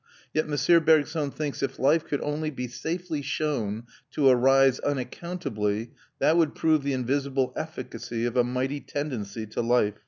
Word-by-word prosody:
Yet 155 Hz, -, +1 dB
M. 150 Hz, +3 st, +4 dB
Bergson 155 Hz, -1 st, +3 dB
thinks 145 Hz, 0 st, -4 dB
if 135 Hz, -, -2 dB
life 150 Hz, +4 st, +3 dB
could 145 Hz, -, -2 dB
only 150 Hz, +1 st, -2 dB
be 125 Hz, -4 st, -5 dB
safely 160 Hz, +4 st, -4 dB
shown 135 Hz, -7 st, -2 dB, 0.3 s
to 140 Hz, -3 st, +4 dB
arise 135 Hz, +1 st, +5 dB
unaccountably, 125 Hz, -, -3 dB, 0.3 s
that 160 Hz, -, +3 dB
would 165 Hz, -3 st, +2 dB
prove 155 Hz, -2 st, +3 dB
the 140 Hz, 0 st, -1 dB
invisible 135 Hz, +1 st, 0 dB
efficacy 115 Hz, 0 st, -4 dB
of 120 Hz, -, -2 dB
a 125 Hz, -, +5 dB
mighty 130 Hz, +3 st, -2 dB
tendency 115 Hz, -8 st, -4 dB
to 110 Hz, +2 st, -3 dB
life. 115 Hz, -3 st, +2 dB
135 Hz, 155 wpm, -27 LUFS, 120-155 Hz, 0.3 s, arise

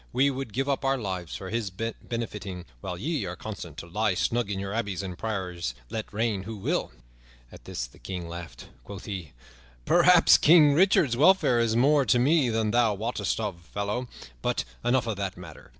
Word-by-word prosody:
We 140 Hz, +2 st, +3 dB
would 135 Hz, -3 st, -5 dB
give 135 Hz, +5 st, -1 dB
up 140 Hz, -1 st, 0 dB
our 135 Hz, 0 st, +2 dB
lives 95 Hz, -7 st, -4 dB
for 95 Hz, -1 st, -7 dB
his 115 Hz, -3 st, -1 dB
benefiting, 105 Hz, -2 st, -5 dB
while 90 Hz, +6 st, -5 dB
ye 150 Hz, -, -2 dB
are 90 Hz, 0 st, -5 dB
content 90 Hz, -5 st, -8 dB
to 85 Hz, -, -7 dB
lie 105 Hz, +2 st, 0 dB
snug 115 Hz, +2 st, 0 dB
in 100 Hz, -, -2 dB
your 100 Hz, +1 st, -4 dB
abbeys 100 Hz, -4 st, -2 dB
and 90 Hz, -2 st, -5 dB
priories 90 Hz, -, -3 dB, 0.2 s
let 110 Hz, -1 st, -4 dB
reign 110 Hz, -2 st, -1 dB
who 110 Hz, +3 st, -7 dB
will." 95 Hz, -, -1 dB, 0.6 s
At -, -, -14 dB
this -, -, -4 dB
the -, -, -17 dB
King 90 Hz, -3 st, -6 dB
laughed. 85 Hz, -7 st, -8 dB, 0.2 s
Quoth 100 Hz, -2 st, -9 dB
he, 95 Hz, -8 st, -6 dB, 0.5 s
"Perhaps -, -, +6 dB
King 150 Hz, -2 st, +7 dB
Richard's 160 Hz, -, +4 dB
welfare 150 Hz, -5 st, +5 dB
is 115 Hz, -1 st, +1 dB
more 140 Hz, +4 st, +4 dB
to 125 Hz, -, +4 dB
me 135 Hz, +1 st, +3 dB
than 110 Hz, -1 st, 0 dB
thou 115 Hz, -3 st, +3 dB
wottest 115 Hz, +4 st, -2 dB
of, 100 Hz, -6 st, -4 dB
fellow. 105 Hz, +7 st, -3 dB, 0.3 s
But -, -, 0 dB, 0.2 s
enough 120 Hz, +1 st, +2 dB
of 110 Hz, -3 st, -3 dB
that 95 Hz, -2 st, -3 dB
matter. 85 Hz, -4 st, -12 dB
110 Hz, 190 wpm, -27 LUFS, 95-120 Hz, 0.6 s, King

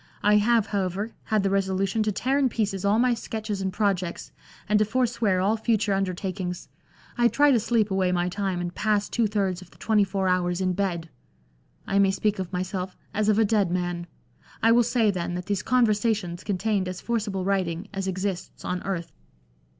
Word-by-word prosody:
I 210 Hz, 0 st, +5 dB
have, 225 Hz, +1 st, +3 dB
however, 200 Hz, +1 st, -2 dB
had 215 Hz, -2 st, +1 dB
the 195 Hz, -, +1 dB
resolution 195 Hz, +2 st, 0 dB
to 215 Hz, 0 st, +1 dB
tear 265 Hz, +7 st, 0 dB
in 270 Hz, -2 st, +3 dB
pieces 200 Hz, -5 st, -2 dB
all 200 Hz, +2 st, +3 dB
my 245 Hz, +1 st, +3 dB
sketches 215 Hz, -3 st, -4 dB
and 190 Hz, 0 st, -1 dB
projects, 190 Hz, -4 st, -1 dB, 0.4 s
and 210 Hz, 0 st, +3 dB
to -, -, +5 dB
forswear 230 Hz, -4 st, +1 dB
all 205 Hz, +4 st, +2 dB
future 215 Hz, -2 st, +1 dB
undertakings. 185 Hz, -1 st, -3 dB, 0.5 s
I 240 Hz, -, +6 dB
try 290 Hz, +4 st, +4 dB
to 245 Hz, -, +4 dB
sleep 220 Hz, -2 st, +1 dB
away 190 Hz, -1 st, +2 dB
my 175 Hz, 0 st, +1 dB
time, 190 Hz, -1 st, -2 dB
and 175 Hz, 0 st, -4 dB
pass 210 Hz, 0 st, +1 dB
two 230 Hz, -2 st, +1 dB
thirds 195 Hz, -3 st, -1 dB
of 185 Hz, -, -13 dB
the -, -, -21 dB
twenty 215 Hz, -2 st, +2 dB
four 195 Hz, -1 st, -1 dB
hours 180 Hz, -1 st, +1 dB
in 185 Hz, -1 st, +1 dB
bed. 175 Hz, -4 st, -2 dB, 0.8 s
I 195 Hz, -, +1 dB
may 195 Hz, -1 st, +5 dB
speak 205 Hz, +1 st, 0 dB
of 185 Hz, -2 st, -4 dB
myself 185 Hz, 0 st, -3 dB, 0.2 s
as 215 Hz, 0 st, +1 dB
of 210 Hz, -, +3 dB
a 225 Hz, -, +4 dB
dead 205 Hz, -3 st, +2 dB
man. 175 Hz, -1 st, -2 dB, 0.6 s
I 225 Hz, -, +6 dB
will 240 Hz, +1 st, +6 dB
say, 235 Hz, -2 st, +2 dB
then, 175 Hz, -2 st, -3 dB
that 180 Hz, 0 st, -4 dB
these 200 Hz, 0 st, -1 dB
Conversations 215 Hz, -7 st, +1 dB
contained 200 Hz, -1 st, 0 dB
as 185 Hz, 0 st, -5 dB
forcible 210 Hz, -5 st, -2 dB
writing 190 Hz, -2 st, -1 dB
as 195 Hz, -1 st, -3 dB
exists 185 Hz, -1 st, -4 dB
on 180 Hz, 0 st, -2 dB
earth." 180 Hz, -3 st, -4 dB
195 Hz, 195 wpm, -25 LUFS, 185-215 Hz, 0.8 s, I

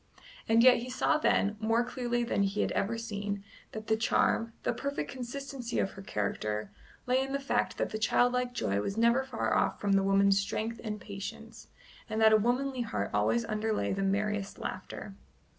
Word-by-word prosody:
And 225 Hz, +1 st, +5 dB
yet 255 Hz, 0 st, +8 dB
he 245 Hz, +2 st, -5 dB
saw 255 Hz, +4 st, +1 dB
then, 210 Hz, -7 st, +2 dB
more 225 Hz, +2 st, +2 dB
clearly 240 Hz, -1 st, -1 dB
than 230 Hz, -3 st, 0 dB
he 200 Hz, +1 st, +1 dB
had -, -, 0 dB
ever 230 Hz, +3 st, 0 dB
seen, 205 Hz, -3 st, -4 dB, 0.3 s
that 220 Hz, 0 st, -7 dB
the 220 Hz, -, +2 dB
charm, 230 Hz, 0 st, +1 dB
the -, -, +1 dB
perfect 280 Hz, +1 st, -3 dB
consistency 255 Hz, -1 st, -5 dB
of 195 Hz, -, +1 dB
her 195 Hz, -, -10 dB
character, 105 Hz, -, -2 dB, 0.3 s
lay 255 Hz, +1 st, +2 dB
in 270 Hz, 0 st, -3 dB
the 275 Hz, -, 0 dB
fact 275 Hz, -, -1 dB
that -, -, -1 dB
the 215 Hz, -, -3 dB
childlike 245 Hz, +3 st, +2 dB
joy 100 Hz, -, 0 dB
was 195 Hz, -, -3 dB
never 235 Hz, +3 st, +4 dB
far 260 Hz, -4 st, -2 dB
off -, -, +1 dB
from 205 Hz, -, 0 dB
the 195 Hz, 0 st, +4 dB
woman's 195 Hz, 0 st, +4 dB
strength 220 Hz, +3 st, -3 dB
and 210 Hz, -2 st, -4 dB
patience, 200 Hz, 0 st, -8 dB, 0.4 s
and 220 Hz, 0 st, -2 dB
that 220 Hz, 0 st, +6 dB
a -, -, +8 dB
womanly 250 Hz, +4 st, 0 dB
heart 105 Hz, -, -2 dB
always 110 Hz, +3 st, +2 dB
underlay 215 Hz, -1 st, -1 dB
the 195 Hz, -, -2 dB
merriest 200 Hz, +1 st, -1 dB
laughter. 190 Hz, +2 st, -6 dB
220 Hz, 190 wpm, -30 LUFS, 195-245 Hz, 0.4 s, yet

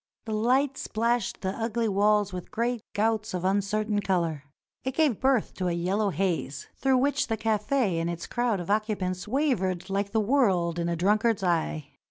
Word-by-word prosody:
The 220 Hz, -, -3 dB
light 255 Hz, +6 st, +2 dB
splashed 235 Hz, 0 st, -1 dB
the 190 Hz, -, -1 dB
ugly 230 Hz, 0 st, -1 dB
walls 205 Hz, 0 st, +2 dB
with 180 Hz, -1 st, -6 dB
great 240 Hz, -1 st, -1 dB
gouts 215 Hz, -1 st, 0 dB
of 180 Hz, 0 st, -3 dB
uncertain 205 Hz, +2 st, +1 dB
color. 170 Hz, -7 st, -1 dB, 0.4 s
It 260 Hz, 0 st, -3 dB
gave 300 Hz, -9 st, +2 dB
birth 260 Hz, -4 st, +2 dB
to 185 Hz, -, -1 dB
a 175 Hz, -, 0 dB
yellow 190 Hz, +5 st, 0 dB
haze, 170 Hz, -6 st, -2 dB
through 265 Hz, -1 st, +2 dB
which 280 Hz, +2 st, +1 dB
the 225 Hz, -, -1 dB
cafe 215 Hz, -2 st, +1 dB
and 165 Hz, +1 st, -1 dB
its 170 Hz, -1 st, -4 dB
crowd 240 Hz, -4 st, 0 dB
of 175 Hz, +2 st, -3 dB
occupants 205 Hz, -4 st, -1 dB
wavered 210 Hz, -, 0 dB
like 200 Hz, +1 st, -1 dB
the 220 Hz, -, +2 dB
world 195 Hz, -8 st, +2 dB
in 170 Hz, 0 st, -1 dB
a 170 Hz, -, 0 dB
drunk 205 Hz, +6 st, +2 dB
ard's 225 Hz, -4 st, +1 dB
eye. 160 Hz, -4 st, 0 dB
210 Hz, 185 wpm, -27 LUFS, 185-235 Hz, 0.4 s, light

